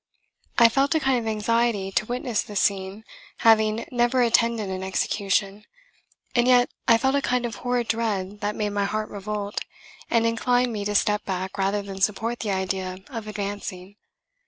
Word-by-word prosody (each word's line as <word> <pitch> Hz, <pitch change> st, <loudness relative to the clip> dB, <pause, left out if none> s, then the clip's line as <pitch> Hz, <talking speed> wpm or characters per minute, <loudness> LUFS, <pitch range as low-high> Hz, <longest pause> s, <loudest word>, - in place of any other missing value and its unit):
I 235 Hz, -, +8 dB
felt 275 Hz, +7 st, +1 dB
a -, -, +4 dB
kind 265 Hz, -4 st, +2 dB
of 225 Hz, -, -5 dB
anxiety 220 Hz, -2 st, 0 dB
to 215 Hz, -, 0 dB
witness 245 Hz, -2 st, -1 dB
the 210 Hz, -, -9 dB
scene, 195 Hz, +1 st, 0 dB, 0.4 s
having 220 Hz, 0 st, +4 dB
never 245 Hz, +1 st, +2 dB
attended 230 Hz, -2 st, +2 dB
an 190 Hz, 0 st, -4 dB
execution, 195 Hz, +1 st, -1 dB, 0.7 s
and 240 Hz, 0 st, +3 dB
yet 245 Hz, -1 st, +5 dB, 0.2 s
I 230 Hz, -2 st, +7 dB
felt 265 Hz, +3 st, +1 dB
a 280 Hz, -, +2 dB
kind 250 Hz, -2 st, 0 dB
of 230 Hz, -, -5 dB
horrid 245 Hz, -1 st, -1 dB
dread 205 Hz, -3 st, -2 dB
that 205 Hz, +1 st, -1 dB
made 210 Hz, -1 st, -1 dB
my 200 Hz, 0 st, 0 dB
heart 215 Hz, +1 st, -3 dB
revolt, 205 Hz, 0 st, -4 dB, 0.5 s
and 230 Hz, -1 st, +3 dB
inclined 245 Hz, +1 st, +1 dB
me 205 Hz, -2 st, -3 dB
to 205 Hz, 0 st, -2 dB
step 210 Hz, +1 st, +2 dB
back 190 Hz, 0 st, -4 dB
rather 200 Hz, +1 st, 0 dB
than 195 Hz, -1 st, -8 dB
support 225 Hz, +4 st, 0 dB
the 215 Hz, -, -3 dB
idea 190 Hz, -1 st, -2 dB
of 225 Hz, -4 st, -6 dB
advancing. 200 Hz, -2 st, -5 dB
215 Hz, 175 wpm, -24 LUFS, 200-235 Hz, 0.7 s, I